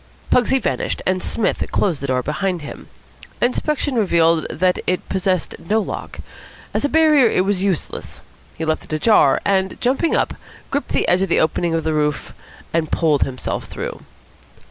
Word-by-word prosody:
Pugsy 250 +2 +4
vanished, 255 - -2
and 185 0 +1
Psmith 225 - 0
closed 170 -9 0
the 140 - -3
door 130 -1 0
behind 175 +3 -2
him. 145 - -9 0.5
Inspection 280 +3 0
revealed 170 -7 +2
the - - -6
fact - - -18
that 185 0 +2
it 185 - -3
possessed 185 -2 0
no 215 +6 0
lock. 215 - -5 0.5
As - - -1
a 285 - +1
barrier 305 -5 +5
it 185 - +1
was 195 -2 0
useless. 190 -5 -3 0.4
He 160 - -3
left 155 0 -1
it - - -9
ajar, 155 -3 +4
and, 190 -1 0
jumping 265 +7 +1
up, - - +1 0.4
gripped 285 +1 -2
the - - 0
edge 180 +1 +3
of 195 - 0
the - - +3
opening 165 +2 +1
in 165 - +1
the 160 0 0
roof 150 -1 -1 0.4
and 160 -2 0
pulled 155 -4 +2
himself 130 -1 -4
through. - - -6
185 Hz, 180 wpm, -20 LUFS, 160-220 Hz, 0.5 s, barrier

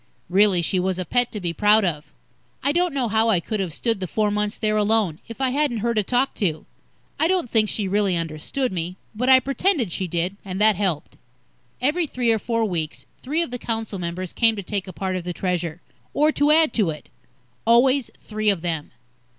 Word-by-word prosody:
Really, 190 -1 +4
she 185 +3 0
was 185 0 0
a 185 - -3
pet 245 +5 +1
to 210 - -5
be 175 -3 -3
proud 210 +3 +4
of. 150 -4 -3 0.5
I 280 - +3
don't 350 +2 +1
know 270 -4 -1
how 225 +1 +2
I 195 -6 +4
could 215 +5 -4
have 185 -4 -2
stood 225 +6 -1
the 185 - -3
four 210 +3 0
months 210 0 -1
there 215 -1 0
alone, 210 -6 +1
if 230 +1 -9
I 265 -1 +1
hadn't 285 -3 +1
her 235 - +1
to 215 - +2
talk 250 +6 0
to. 160 -6 -1 0.5
I 320 - +3
don't 360 -9 0
think 215 -2 +3
she 205 -3 -1
really 195 -2 +1
understood 165 - -3
me, 175 0 -4 0.2
but 250 +4 -1
I 260 0 +8
pretended 275 - 0
she 185 +2 -2
did, 175 +3 -2
and 190 -1 -5
that 215 0 +5
helped. 180 -6 -2 0.6
Every 310 +6 +1
three 245 -4 0
or 220 - +2
four 230 +1 0
weeks, 165 -6 -3 0.2
three 310 +6 0
of 295 - -7
the 245 - -4
council 225 -4 -3
members 175 +1 -4
came 225 -2 +3
to 200 - -5
take 200 0 -3
a - - -6
part 190 +1 -3
of 185 - -3
the 175 0 -4
Treasure, 175 -2 -2 0.3
or 300 +1 +4
to 290 0 +2
add 315 0 +5
to 210 -7 +2
it. 150 -1 -7 0.6
Always 255 +2 +4
three 215 0 -1
of 190 -5 0
them. 160 -4 -3
210 Hz, 220 wpm, -23 LUFS, 180-245 Hz, 0.6 s, I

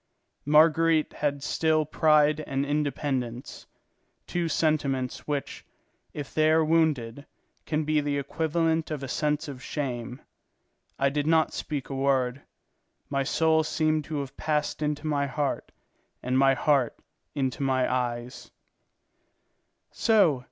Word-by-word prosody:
Marguerite 160 +1 +4
had 140 -2 -2
still 155 0 +1
pride 155 0 +3
and 135 0 -1
independence, 140 -4 -3 0.6
two 175 -1 -2
sentiments 140 -6 -1
which, 145 -2 -3 0.5
if 145 -2 -7
they 155 0 +3
are 160 0 +4
wounded, 150 -5 0 0.4
can 155 0 0
be 155 0 +1
the 145 -1 -1
equivalent 160 +3 0
of 150 -3 -4
a - - -4
sense 150 +4 -1
of 135 -3 -8
shame. 125 -4 -4 0.8
I 140 - +2
did 145 +1 -2
not 160 -1 +3
speak 145 -4 -4
a - - -3
word; 135 -1 0 0.7
my 140 -1 +1
soul 160 +3 +2
seemed 155 0 0
to 150 -2 -3
have 140 0 -8
passed 150 0 -1
into 150 0 -2
my 145 -2 0
heart 140 +1 -3 0.5
and 125 +1 -1
my 135 0 +4
heart 135 -4 +1 0.4
into 135 -2 -2
my 130 -2 +1
eyes. 125 0 -3
145 Hz, 125 wpm, -27 LUFS, 135-155 Hz, 0.8 s, Marguerite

